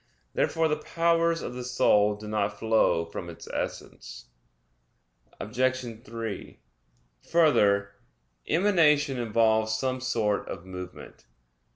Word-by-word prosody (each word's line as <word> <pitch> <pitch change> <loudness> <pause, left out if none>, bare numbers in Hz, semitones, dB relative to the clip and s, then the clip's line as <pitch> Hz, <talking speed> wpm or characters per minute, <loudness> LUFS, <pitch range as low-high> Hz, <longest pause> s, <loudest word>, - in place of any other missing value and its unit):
Therefore 165 0 +1
the 150 - 0 0.2
powers 170 0 +2
of 125 - -5
the 125 0 -6
soul 105 -4 +3
do 105 +1 -10
not 105 0 -1
flow 110 -7 +2
from 85 +1 -7
its 85 - -11
essence. - - -6 1.1
Obj. 120 0 -2
3: 115 -4 -6 0.7
Further, 100 -12 +3 0.5
emanation 150 -7 +3
involves 110 -1 +2
some 130 +2 -2
sort 110 -5 -1
of 90 -1 -7
movement. 90 -6 -10
115 Hz, 105 wpm, -27 LUFS, 105-140 Hz, 1.1 s, soul